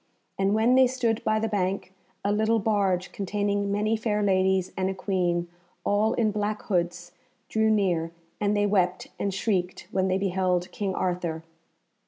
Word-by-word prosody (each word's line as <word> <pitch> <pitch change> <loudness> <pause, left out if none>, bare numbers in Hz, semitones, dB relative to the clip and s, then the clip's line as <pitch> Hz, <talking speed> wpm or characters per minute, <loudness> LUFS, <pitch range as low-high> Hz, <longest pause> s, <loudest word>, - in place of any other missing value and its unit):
And 195 +1 +1
when 225 +3 +4
they 260 0 +6
stood 240 -3 -1
by 215 -1 +2
the 225 - 0
bank, 190 -2 -2 0.3
a 200 - +2
little 220 +2 +2
barge 195 -4 +1
containing 200 0 -1
many 210 +2 +1
fair 215 -1 0
ladies 190 -1 +2
and 190 0 0
a 190 - -3
Queen, 180 -3 0 0.4
all 210 +2 +2
in 220 -3 +2
black 210 0 -2
hoods, 175 -2 -1 0.4
drew 220 0 +2
near, 180 -6 +1 0.3
and 210 0 +1
they 205 - +3
wept 185 -3 +1
and 200 - 0
shrieked 190 -2 -1
when 190 0 +1
they 185 0 +1
beheld 185 -2 0
King 195 -3 -3
Arthur. 175 -3 -2
200 Hz, 165 wpm, -26 LUFS, 185-215 Hz, 0.4 s, they